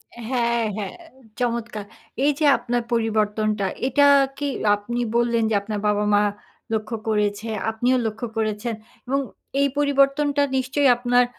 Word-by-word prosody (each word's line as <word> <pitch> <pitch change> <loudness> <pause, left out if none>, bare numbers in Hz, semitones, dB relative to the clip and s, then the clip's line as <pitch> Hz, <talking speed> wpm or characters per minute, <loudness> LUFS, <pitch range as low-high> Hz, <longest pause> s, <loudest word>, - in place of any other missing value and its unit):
এ - - -12
হ্যাঁ, 235 -2 +1
হ্যাঁ। 200 -3 -5 0.4
চমৎকার! 235 -3 -2 0.4
এইযে 295 +1 +2
আপনার 240 0 -2
পরিবর্তনটা 215 -2 0 0.2
এটা 285 +2 +3 0.3
কি 290 0 -2 0.3
আপনি 235 +4 -5 0.2
বললেন 235 -1 +2
যে 220 - +1
আপনার 210 0 -4
বাবা-মা 210 0 +2 0.5
লক্ষ্য 220 +1 -2
করেছে, 210 +1 0 0.2
আপনিও 245 +3 +1
লক্ষ্য 220 +2 -3
করেছেন। 220 +1 -1 0.3
এবং 275 +2 +1 0.4
এই 280 - +4
পরিবর্তনটা 285 0 +2 0.2
নিশ্চয়ই 265 +2 +2
আপনার 245 0 +3
235 Hz, 125 wpm, -23 LUFS, 215-255 Hz, 0.5 s, এই